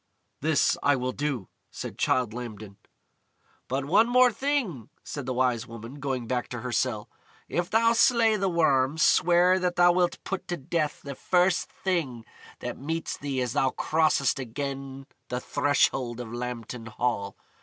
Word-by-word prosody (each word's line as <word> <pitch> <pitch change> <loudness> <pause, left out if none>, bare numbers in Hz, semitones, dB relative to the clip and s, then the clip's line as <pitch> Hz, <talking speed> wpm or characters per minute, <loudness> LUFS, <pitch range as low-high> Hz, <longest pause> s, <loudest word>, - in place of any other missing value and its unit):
"This 155 +1 +2
I 145 0 +3
will 130 0 -2
do," 140 -8 -3 0.2
said - - -7
Childe 125 -4 +1
Lambton. 110 -4 -8 0.9
"But 135 +1 -2
one 220 +10 +4 0.2
thing 280 -1 0
more," 125 -9 -10 0.2
said 140 -3 -6
the 130 - -1
Wise 125 -2 +1
Woman, 115 +4 -9
going 135 -3 -2
back 125 +1 -2
to 120 -2 -6
her 125 0 -4
cell. 115 -2 -1 0.4
"If 175 0 -2
thou 230 +1 +4
slay 230 -2 +4
the 195 -2 0
Worm, 145 -4 +2
swear 175 +3 +4
that 180 -1 -1
thou 175 0 +6
wilt 175 0 +1
put 195 - -4
to 175 - -2
death 150 +2 -2
the 140 - -6
first 180 +5 +1
thing 145 -12 -2 0.4
that - - -5
meets 160 +4 -3
thee 135 -3 -2
as 125 - -3
thou 130 +2 +2
crossest 155 -1 +1
again 135 +1 -5 0.2
the 125 - -2
threshold 130 -3 +1
of 120 -2 -7
Lambton 120 -1 -5
Hall. 110 -3 -2
135 Hz, 160 wpm, -27 LUFS, 125-175 Hz, 0.9 s, thou